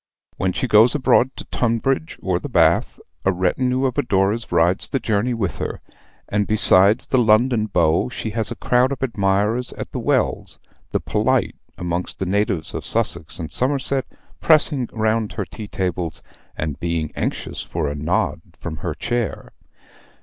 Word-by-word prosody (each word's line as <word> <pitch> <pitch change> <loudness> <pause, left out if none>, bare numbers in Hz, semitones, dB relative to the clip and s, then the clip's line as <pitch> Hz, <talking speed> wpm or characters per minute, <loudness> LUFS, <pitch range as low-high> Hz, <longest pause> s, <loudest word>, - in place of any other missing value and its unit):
When 95 0 0
she 130 - -2
goes 110 +4 +5
abroad 130 -2 +3
to - - -8
Tunbridge 130 +6 -1
or 90 -2 0
the - - -7
Bath, - - +2 0.2
a 95 - +3
retinue 125 +9 0
of 130 +1 0
adorers 105 -2 0
rides 90 +3 +3
the 135 - -1
journey 115 +2 0
with 100 -7 -2
her; - - -4 0.5
and 105 0 0
besides 105 0 +6
the 130 - +1
London 110 0 +3
beaux, 85 +1 +2
she 115 -2 -5
has 110 -1 -2
a 120 - -5
crowd 125 +3 +2
of 135 - -4
admirers 105 +1 0
at - - -7
the - - -4
Wells, - - -1 0.3
the - - 0
polite - - 0 0.2
amongst 90 +1 -3
the 95 - -3
natives 95 -3 -1
of - - -4
Sussex 80 - 0
and 80 -4 -6
Somerset 135 - -1 0.3
pressing 150 -5 +3
round 110 -1 0
her - - -3
tea 110 -2 -9
tables, 90 -4 -3 0.3
and 75 -3 -4
being 85 -2 -2
anxious - - -3
for 80 -3 -3
a 70 - -2
nod 75 +1 -1 0.2
from 80 -2 -6
her - - -4
chair. 120 -3 -3
105 Hz, 165 wpm, -21 LUFS, 90-125 Hz, 0.5 s, besides